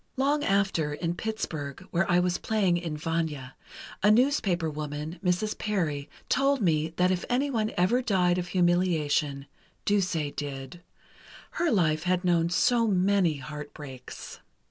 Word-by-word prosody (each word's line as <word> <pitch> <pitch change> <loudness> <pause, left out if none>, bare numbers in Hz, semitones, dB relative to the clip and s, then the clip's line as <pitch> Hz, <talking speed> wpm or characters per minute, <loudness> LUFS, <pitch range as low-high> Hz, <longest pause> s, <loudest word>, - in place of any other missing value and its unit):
"Long 285 +3 +2
after, 195 - +1
in 170 +2 -2
Pittsburgh, 175 -8 -4
where 170 +2 +1
I 175 0 +4
was 180 0 0
playing 195 -6 +1
in 165 -3 -4
'Vanya,' 155 -5 -3 0.5
a 205 - +5
newspaper 215 - +3
woman, 150 +2 -5
Mrs. 185 +4 0
Parry, 155 -9 -2 0.2
told 275 +1 +2
me 160 -6 +2
that 180 +2 +3
if 180 -1 -1
anyone 245 -4 0
ever 200 +8 +3
died 180 -6 +2
of 180 - -4
humiliation, 170 -6 +1 0.4
Duse 195 -4 +1 0.2
did... 140 +3 -6 0.7
her 345 - 0
life 160 - +2
had 180 0 +1
known 170 -1 +3
so 230 +6 +3
many 190 -4 +2
heartbreaks. 145 -2 -9
175 Hz, 135 wpm, -27 LUFS, 155-200 Hz, 0.7 s, a